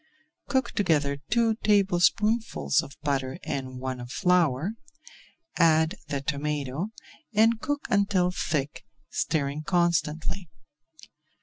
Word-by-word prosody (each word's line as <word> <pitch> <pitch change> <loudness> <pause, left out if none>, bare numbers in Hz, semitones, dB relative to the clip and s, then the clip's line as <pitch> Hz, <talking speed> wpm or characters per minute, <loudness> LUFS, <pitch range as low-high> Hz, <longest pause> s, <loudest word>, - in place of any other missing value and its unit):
Cook 265 -1 0
together 150 -8 +1
two 225 -1 +2
tablespoonfuls 205 - +2
of 140 - -11
butter 135 -2 -1
and 130 -2 -4
one 130 0 -4
of 120 0 -8
flour, 175 -2 +2 0.9
add 160 0 +4
the 140 -1 -2
tomato, 145 +2 -2 0.5
and 225 +1 +4
cook 290 0 -2
until 200 -3 +2
thick, 150 -5 -2 0.3
stirring 145 -1 -1
constantly. 170 0 0
160 Hz, 100 wpm, -27 LUFS, 140-200 Hz, 0.9 s, add